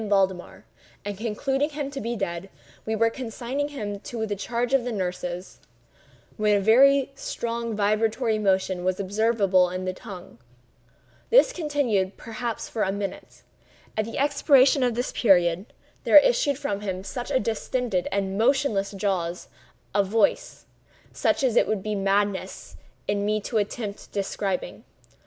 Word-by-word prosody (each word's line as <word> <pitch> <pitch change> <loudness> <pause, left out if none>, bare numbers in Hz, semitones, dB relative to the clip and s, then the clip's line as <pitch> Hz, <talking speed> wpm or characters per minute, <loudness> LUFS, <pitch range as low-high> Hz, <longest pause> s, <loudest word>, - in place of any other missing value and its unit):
Valdemar; 190 -3 0 0.4
and 205 0 -3
concluding 270 +7 -1
him 290 -2 -4
to 275 - -5
be 235 +2 -2
dead, 190 -3 -4 0.4
we 220 - 0
were 230 +1 +2
consigning 255 +4 -4
him 210 -8 -5
to 220 +1 -4
the 205 -1 -3
charge 235 +5 -2
of 270 -3 +4
the 245 - -3
nurses, 180 -2 -4 0.8
when 210 -2 +2
a 275 +4 +6
strong 235 -4 -4
vibratory 215 +2 +1
motion 190 -3 +1
was 185 +1 0
observable 200 -2 +2
in 185 +1 -4
the 185 - -2
tongue. 185 - -11 0.9
This - - +5
continued 270 - 0
for - - -31
perhaps 230 +1 -5
a 210 -4 +1
minute. 200 0 -6 0.5
At 215 - 0
the 230 - -6
expiration 280 -1 +4
of 245 -2 +1
this 245 +1 -2
period, 180 -2 +3 0.4
there - - +7
issued - - +4
from 205 -9 -2
the 210 +7 -3
distended 225 -3 -1
and 195 0 -1
motionless 230 -5 +2
jaws 185 -4 -2 0.4
a 200 0 +3
voice—such 215 +6 -2
as 250 -4 +2
it - - +4
would 210 -3 -1
be 215 - -2
madness 200 0 -1 0.3
in 205 0 0
me 215 +1 +1
to 220 +2 -1
attempt 205 0 -5
describing. 195 -1 -3
215 Hz, 140 wpm, -25 LUFS, 195-245 Hz, 0.9 s, there